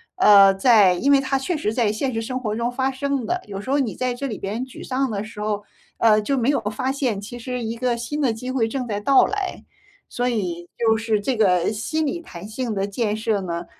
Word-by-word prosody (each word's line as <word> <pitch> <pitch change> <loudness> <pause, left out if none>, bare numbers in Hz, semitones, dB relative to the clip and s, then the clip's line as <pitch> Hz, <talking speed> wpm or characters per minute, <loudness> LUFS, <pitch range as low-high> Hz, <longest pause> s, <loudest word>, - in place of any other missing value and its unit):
呃， 200 - +7
在 205 -3 +5
因 270 +11 +1
为 275 - +6
它 270 0 0
确 335 +6 -2
实 225 -8 -1
在 225 -4 +1
现 255 +5 -2
实 225 - -1
生 255 +3 -3
活 215 -4 -3
中 235 +2 -1
发 265 +2 0
生 275 -1 -2
的， 360 +6 -1
有 195 -1 -6
时 260 - -9
候 280 +2 +2
你 245 -7 -1
在 255 -1 -1
这 275 +3 -4
里 220 -6 -5
边 215 +6 -4
沮 260 - -11
丧 265 0 -1
的 200 0 -2
时 215 0 -10
候， 210 -1 -2 0.3
呃， 215 -2 +4
就 275 +5 -1
没 245 +2 +1
有 285 - +2
发 215 +6 -2
现 260 -7 -1
其 230 +4 -8
实 250 +1 -4
一 225 +1 -3
个 245 0 0
新 240 +6 -4
的 245 -5 +2
机 250 +3 -7
会 255 -3 +1
正 250 +2 -3
在 205 -2 -2
到 270 +5 +5
来。 405 -2 -4 0.5
所 245 0 -1
以， 180 -8 -2
就 225 -1 +3
是 220 -2 0
这 255 +1 -1
个 180 -3 +3
心 270 +9 -2
理 300 +3 -2
弹 200 - -10
性 230 +1 -3
的 195 0 -1
建 210 +1 -1
设 215 -2 -1
呢？ 170 -2 -4
230 Hz, 265 characters per minute, -22 LUFS, 210-265 Hz, 0.5 s, 呃